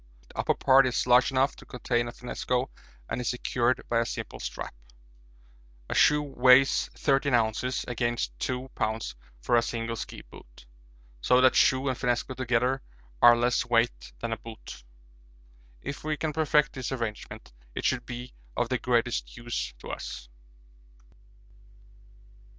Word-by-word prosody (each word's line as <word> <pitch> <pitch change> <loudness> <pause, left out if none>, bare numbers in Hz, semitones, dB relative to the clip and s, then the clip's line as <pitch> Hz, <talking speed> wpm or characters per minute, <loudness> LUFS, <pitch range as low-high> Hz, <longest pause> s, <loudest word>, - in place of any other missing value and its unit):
The - - -11
upper - - +2
part 135 0 +5
is 125 - 0
large 125 0 +5
enough 135 +1 +1
to - - -13
contain 120 -1 -1
a - - -5
finnesko 125 +1 -3 0.4
and 125 - -3
is 120 - -1
secured 125 0 0
by 115 - +2
a 115 - +1
simple - - -6
strap. - - -6 1.2
A - - +1
shoe 150 0 +4
weighs 130 -1 +4
13 135 -2 +2
oz. 115 +2 0
against 120 - -1
2 130 +1 -3
lbs. 110 - -2 0.3
for 120 - +1
a 120 - +5
single 115 0 -3
ski - - -7
boot - - -15 0.6
so 125 - +4
that 130 0 +6
shoe 130 +1 +4
and 130 - +1
finnesko 125 0 -1
together 125 +1 0 0.4
are 120 0 +8
less 120 +1 +2
weight 115 - 0
than - - -2
a - - -4
boot. 115 - -11 1.0
If 140 - -6
we 155 0 -1
can 155 +1 -2
perfect 150 -1 +2
this 130 -2 -4
arrangement 115 - -5 0.2
it - - -4
should 125 -2 0
be 125 +1 -7 0.2
of 120 -1 0
the 130 -2 0
greatest 120 0 0
use 120 - -4
to - - -10
us. - - -7
125 Hz, 150 wpm, -28 LUFS, 115-130 Hz, 1.2 s, are